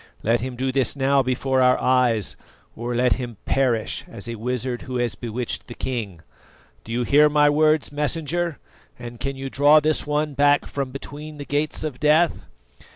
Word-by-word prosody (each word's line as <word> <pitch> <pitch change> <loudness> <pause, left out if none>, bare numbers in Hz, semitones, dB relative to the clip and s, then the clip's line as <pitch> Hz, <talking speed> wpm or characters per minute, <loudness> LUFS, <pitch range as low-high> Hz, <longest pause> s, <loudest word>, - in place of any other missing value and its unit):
Let 115 +2 +2
him 130 0 -4
do 130 +2 -1
this 135 0 +1
now 140 0 +3
before 130 +1 0
our 125 0 +4
eyes, 125 -5 +2 0.4
or 120 +1 -4
let 125 +1 +2
him 120 -4 -6
perish 125 -5 0
as 115 -1 -8
a 115 - -4
wizard 125 +2 -3
who 130 -2 -7
has 120 -2 0
bewitched 120 0 -4
the 120 - -9
king. 105 -10 -4 0.6
Do 115 - -10
you 120 +1 0
hear 150 +4 +5
my 150 0 +4
words, 155 0 +2
Messenger, 160 +2 -2 0.4
and 120 -1 -9
can 135 +2 -3
you 135 0 -5
draw 145 +3 +5
this 155 0 0
one 150 0 0
back 145 +1 +3
from 140 -2 -4
between 145 +3 -8
the 145 - -7
Gates 145 +2 -1
of 150 -5 -5
Death?" 155 +3 +2
135 Hz, 180 wpm, -23 LUFS, 120-145 Hz, 0.6 s, hear